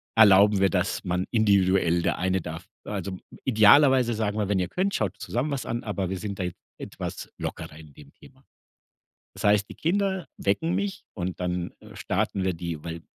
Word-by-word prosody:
erlauben 105 -1 +6
wir, 95 0 +4
dass 90 +2 -1
man 90 0 -1
individuell, 95 -5 +3
der - - 0
eine 95 0 0
darf 80 +2 -7 0.2
also, 100 -2 -4 0.3
idealerweise 130 +2 +5
sagen 110 -1 -2
wir: 105 -2 -1
„Wenn 100 -2 +1
ihr 90 - 0
könnt, 195 +2 -1
schaut 100 -5 -1
zusammen 120 +11 -2
was 140 -2 -3
an“, 120 +1 -3
aber 100 -4 -3
wir 95 - -3
sind 100 -1 -5
da 95 - -2
jetzt 90 -1 -5 0.2
etwas - - -6
lockerer - - -6
in 80 -2 -13
dem 70 -2 -15
Thema. - - -19 0.9
Das 95 - -8
heißt, 105 -1 +3
die - - -9
Kinder 190 +1 0
wecken 130 - 0
mich 200 0 -2
und 90 -2 -4
dann, 90 -1 -3
äh, - - -14
starten 95 - -1
wir 95 -1 0
die, 85 -3 -5
weil 85 0 -6
100 Hz, 190 wpm, -26 LUFS, 90-115 Hz, 0.9 s, erlauben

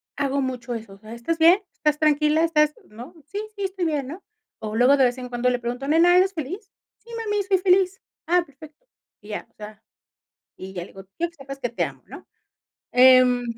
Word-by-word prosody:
hago 280 0 -1
mucho 250 -2 -4
eso. 220 -3 -8
O - - -19
sea: 215 +1 -11
"¿Estás 235 +8 -3
bien? 340 +5 +6
¿Estás 300 -1 0
tranquila? 305 +1 +3
¿Estás?", 300 -2 +2 0.2
¿no? 240 +10 -11
"Sí, 405 +7 -6 0.2
sí, 400 - -5
estoy 380 -1 -4
bien", 290 -5 -1
¿no? 340 +7 -9 0.4
O, 215 0 -5
luego 250 +4 +5
de 270 - +4
vez 245 +1 0
en 250 - -6
cuando 245 +1 0
le 245 0 -1
pregunto: 245 +3 -5
"Nena, 345 +4 +5
¿eres 380 +1 +3
feliz?". 370 - -6 0.3
"Sí, 470 - -22
mami, 415 -2 -1
soy 385 -1 +2
feliz". 370 0 +2 0.3
"Ah, 355 +1 +3
perfecto". 300 - -16 0.4
Y 205 - -15
ya. 210 - -6
O - - -41
sea, 215 0 -11 0.7
y 190 +1 -9
ya 175 - -4
le - - -9
digo: 195 0 -13
"Quiero 340 0 -1
que 335 - -29
sepas 275 -1 -9
que 245 - -1
te 235 - -1
amo", - - -8
¿no? - - -12 0.7
Em, 250 -1 +6
285 Hz, 215 wpm, -23 LUFS, 245-345 Hz, 0.7 s, bien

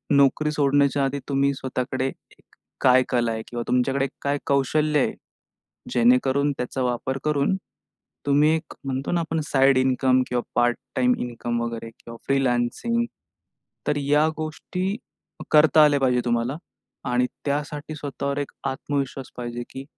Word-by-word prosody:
नोकरी 140 +2 +3
सोडण्याच्या 140 -1 +2
आधी 140 +1 -2
तुम्ही 140 0 +2
स्वतःकडे 130 0 -2
एक - - -12 0.4
काय 130 0 +6
कला 120 -2 +1
आहे 110 0 -3
किंवा 120 -1 -4
तुमच्याकडे 135 +2 +1
काय 140 0 0
कौशल्य 150 +2 +2
आहे? - - +1 0.8
जेणेकरून 130 +4 +3
त्याचा 125 +1 -3
वापर 125 +2 -1
करून 150 +4 +1 0.7
तुम्ही 145 +2 +4
एक 160 -1 -6
म्हणतो 135 0 -2
ना, 175 - +2
आपण 165 -1 -2
साइड 135 -1 +4
इन्कम 130 0 +3
किंवा 125 -1 0
पार्ट 120 0 +3 0.2
टाईम 250 0 +3
इन्कम 120 -1 -3
वगैरे 115 -1 -4
किंवा 115 0 -10
फ्रीलान्सिंग, 135 - +1 0.8
तर 145 - +1
या 145 +2 +3
गोष्टी 180 +5 -3 0.6
करता 155 0 +6
आल्या 145 -1 +4
पाहिजे 125 -2 +2
तुम्हाला. 120 +3 0 0.5
आणि 125 0 +2 0.2
त्यासाठी 145 +1 -3
स्वतःवर 140 -1 -4
एक 145 - -4 0.2
आत्मविश्वास 135 0 -3
पाहिजे, 120 0 -4
की 135 - -7
135 Hz, 140 wpm, -24 LUFS, 125-145 Hz, 0.8 s, काय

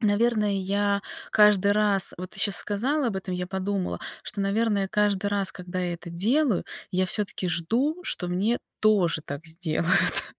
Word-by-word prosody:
наверное, 215 0 +2
я 200 +1 0 0.3
каждый 210 -2 +5
раз 205 -2 +3
вот 185 0 -7
ты - - -2
щас 200 - +4
сказала 260 +8 +1
об 205 - -3
этом, 190 -1 -5
я 180 0 -3
подумала, 190 0 -3 0.2
что, 205 - -4
наверное, 200 0 0
каждый 205 -1 +1
раз, 200 -1 -1
когда 180 0 -6
я 175 -1 -1
это 170 0 -10
делаю, 230 - +1 0.3
я 185 +1 +1
всё-таки 195 0 0
жду, 230 - 0
что 180 - -2
мне 200 +7 0 0.2
тоже 190 -7 +2
так 145 +3 -7
сделают. 165 0 +2
200 Hz, 160 wpm, -26 LUFS, 180-210 Hz, 0.3 s, каждый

